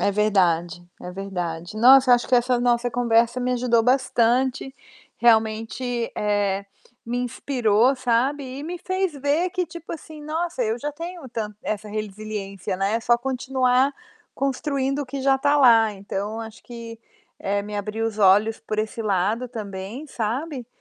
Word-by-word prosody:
É 200 - +2
verdade, 175 -5 +1 0.2
é 180 - -6
verdade. 180 -1 -5
Nossa, 255 +3 +7
eu 245 - +9
acho 240 - -1
que 255 - +2
essa 245 0 +3
nossa 245 0 +1
conversa 235 0 +2
me 250 0 0
ajudou 240 -2 +2
bastante, 255 +1 +1 0.4
realmente, 230 +1 +1
eh, 205 -1 0 0.4
me 240 +2 -2
inspirou, 245 -1 +1
sabe. 255 +3 +1 0.2
E - - -6
me 345 +3 -5
fez 375 -1 -1
ver 290 +6 0
que, 360 0 -1
tipo 335 0 -9
assim, 310 -1 -9
nossa, 320 -2 -2
eu 225 +1 -1
já 295 +4 -3
tenho 335 -2 -7
tan 215 -3 -4
essa 215 0 -3
resiliência, 210 -2 -5
né, 195 +3 0
é 230 - 0
só 235 +1 +3
continuar 260 +1 +1 0.4
construindo 275 0 -1
o 285 - -4
que 275 +1 -5
já 270 0 +4
está 285 +2 +2
lá, 225 -5 +6
então, 200 +2 -5
eu - - -4
acho 225 0 -9
que, 230 -1 -9 0.4
eh, 200 +1 -1
me 205 +1 -6
abriu 215 +2 -2
os 215 -1 -5
olhos 205 +3 +4
por 215 -1 -4
esse 220 +2 -2
lado 210 +5 0
também, 215 +4 -7
sabe. 250 +3 -3
235 Hz, 165 wpm, -23 LUFS, 210-265 Hz, 0.4 s, eu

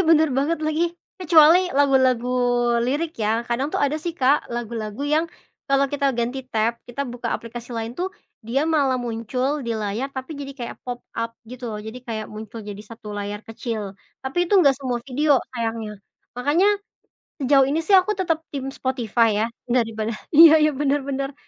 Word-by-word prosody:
bener 315 -1 +5
banget 310 +4 +1
lagi. 310 +2 +1 0.3
Kecuali 330 -2 +6
lagu-lagu 260 -3 +3 0.6
lirik 305 +6 -1
ya, 220 +1 +1
kadang 250 +4 0
tuh - - 0
ada 285 +2 +1
sih 335 +2 -4
Kak, 280 -2 +3
lagu-lagu 230 -1 -4
yang 310 +3 +2 0.4
kalau 275 0 +3
kita 280 -1 +1
ganti 240 +3 -1
tab, 225 +1 +1
kita 275 +4 -3
buka 240 -1 -4
aplikasi 235 +1 -6
lain 230 +1 -4
tuh 375 +2 -3 0.3
dia 255 +5 0
malah 285 -5 +2
muncul 250 +4 -2
di 230 - 0
layar 215 +5 -2
tapi 265 +3 -6
jadi 275 -1 -6
kayak 235 - -6
pop-up, 240 -2 -5 0.2
gitu 250 +1 -9
loh. 210 - -5
Jadi 220 +3 -7
kayak 220 -2 -4
muncul 220 +1 -8
jadi 205 -1 -8
1 225 -2 -10
layar 205 0 -4
kecil 220 -3 -5 0.3
tapi 310 +7 0
itu 380 - 0
nggak 275 -5 +4
semua 255 -3 -2
video, 280 +1 +3 0.2
sayangnya. 225 -2 -3 0.4
Makanya 295 +10 +3 0.7
sejauh 270 0 +5
ini 285 +4 0
sih 385 +4 +5
aku 375 +3 +3
tetap 330 -4 -1
tim 270 -1 -3
Spotify 240 -4 +1
ya, - - +2 0.2
daripada 225 -2 0 0.2
iya 315 0 +8
iya, 305 - +5
benar 290 0 +1
benar, 275 0 -3
260 Hz, 170 wpm, -23 LUFS, 230-290 Hz, 0.7 s, iya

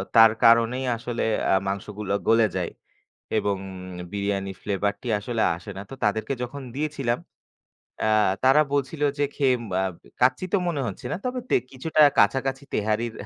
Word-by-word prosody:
তার 115 -1 +9
কারণেই 115 +3 +5
আসলে 120 +1 -3 0.2
অ্যা - - +2
আসলে 95 - -4
মাংসগুলো 100 +1 -3 0.2
গলে 115 0 +5
যায়। - - -1 0.7
এবং 100 -1 0 0.5
বিরিয়ানি 100 -1 -2
Flavor 100 0 0
টি - - -8
আসলে 115 +2 -2
আসে 85 - -11
না। 95 - -5
তো 135 - -6
তাদেরকে 110 +5 0
যখন 135 +4 -6
দিয়েছিলাম, 140 -5 -1 0.8
অ্যা 110 - +1 0.4
তারা 135 +3 +6
বলছিল 140 +2 -1 0.2
যে 145 - +3
খেয়ে 135 -3 +3 0.3
আম 95 - -2 0.3
কাচ্চি 130 +8 +3
তো 200 - +5
মনে 155 -5 -1
হচ্ছে - - -8
না। - - 0
তবে 250 0 -2
তে - - +3 0.2
কিছুটা 155 +4 -1 0.2
কাছাকাছি 135 +6 +2
তেহারির 110 +2 0
115 Hz, 160 wpm, -25 LUFS, 105-135 Hz, 0.8 s, তার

